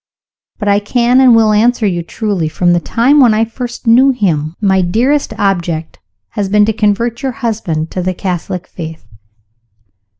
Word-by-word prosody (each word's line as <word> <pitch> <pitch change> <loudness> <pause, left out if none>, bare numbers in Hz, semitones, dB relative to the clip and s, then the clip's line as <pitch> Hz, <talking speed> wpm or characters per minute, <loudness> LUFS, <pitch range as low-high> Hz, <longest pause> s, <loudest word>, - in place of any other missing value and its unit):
"But 210 - -5
I 200 0 +3
can, 240 +4 +2
and 250 -3 +6
will, 220 -1 +3
answer 230 +2 +2
you 175 -4 -1
truly. 180 -2 -3
From 175 +2 +1
the 175 - +2
time 245 +10 +2
when 240 -5 +5
I 225 +1 +2
first 240 +2 -7
knew 245 +4 +5
him, 170 - -1
my 190 -3 +2
dearest 240 +12 0
object 175 -6 -2 0.3
has 205 -3 -3
been 210 +1 +3
to 220 - 0
convert 225 +3 -1
your 265 -2 -3
husband 210 - -3
to 185 - -3
the 185 +1 -2
Catholic 180 -1 -4
Faith." 160 - -9
210 Hz, 170 wpm, -13 LUFS, 180-235 Hz, 0.3 s, and